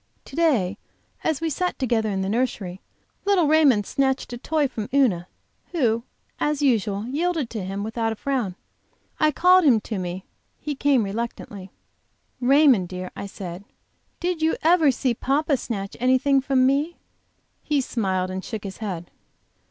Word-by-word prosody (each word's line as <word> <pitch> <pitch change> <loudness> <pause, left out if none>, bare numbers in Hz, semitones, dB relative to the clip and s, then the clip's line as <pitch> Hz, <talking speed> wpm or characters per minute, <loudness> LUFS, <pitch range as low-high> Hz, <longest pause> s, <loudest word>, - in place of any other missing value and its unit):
To 270 - -11
day 230 - +2 0.4
as 315 -3 0
we 325 -1 -1
sat 360 +5 -1
together 230 -4 0
in 190 -1 -1
the - - -2
nursery, 200 -5 -2 0.4
little 395 -4 +3
Raymond 290 -9 +4
snatched 265 0 0
a - - -4
toy 300 +2 +1
from 220 -5 -6
Una, 225 -11 +2 0.5
who, 235 -9 +2 0.4
as 295 -1 0
usual, 215 -5 +1
yielded 315 -1 -1
to 215 -4 -4
him 195 +2 -4
without 225 +1 -1
a - - -3
frown. 240 -7 -2 0.6
I 310 - +4
called 365 +5 +5
him 255 -8 +5
to 215 -2 -4
me; 180 +1 -5 0.3
he 295 - -3
came 275 -3 +2
reluctantly. 200 -2 -5 0.7
"Raymond, 260 - +5
dear," 185 0 -6
I 200 - -5
said, 185 -1 -7 0.6
"did 350 -2 -2
you 320 0 +2
ever 325 -2 +5
see 255 -1 +1
papa 280 +5 +1
snatch 200 -6 -5
anything 260 +2 +3
from 265 -1 +2
me?" 285 +6 +1 0.7
He 295 -2 0
smiled, 190 -8 -1
and 190 0 -4
shook 220 -3 -6
his 195 -2 -7
head. 180 -6 -5
250 Hz, 160 wpm, -24 LUFS, 200-290 Hz, 0.7 s, called